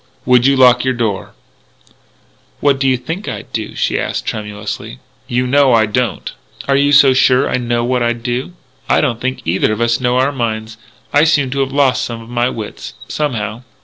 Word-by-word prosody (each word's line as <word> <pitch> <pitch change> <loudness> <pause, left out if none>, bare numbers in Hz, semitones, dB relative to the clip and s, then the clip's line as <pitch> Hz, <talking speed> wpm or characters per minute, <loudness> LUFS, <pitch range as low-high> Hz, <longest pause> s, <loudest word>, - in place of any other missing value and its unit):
"Would 125 0 +4
you 140 - +4
lock 125 -2 +5
your 130 -1 0
door?" 110 -5 -3 1.2
"What 140 -2 +2
do 135 - +1
you 130 -1 +3
think 165 +10 -6
I'd - - -7
do?" - - -4
she - - 0
asked - - -3
tremulously. 105 - -5 0.3
"You 125 +1 0
know; 135 0 +3
I 110 -1 +4
don't." 110 0 -2 0.4
"Are 140 - +2
you 140 +1 +3
so 140 -2 +6
sure 130 0 +3
I - - 0
know 120 -1 -1
what 125 0 0
I'd 120 0 -1
do? 125 +7 -3 0.4
I - - +4
don't 115 -2 -1
think 130 0 -3
either 90 +6 +1
of 110 - -3
us 120 0 +1
know 125 -1 +1
our 130 +2 +2
own 145 - -8
minds.... 110 -2 -3 0.4
I 145 - +5
seem 150 -5 +2
to 140 - -2
have 135 -1 0
lost 140 -2 +2
some 115 -1 -5
of 115 0 -13
my 120 +1 0
wits.... 105 - -7 0.2
Somehow...." 115 -6 -3
125 Hz, 205 wpm, -16 LUFS, 115-135 Hz, 1.2 s, so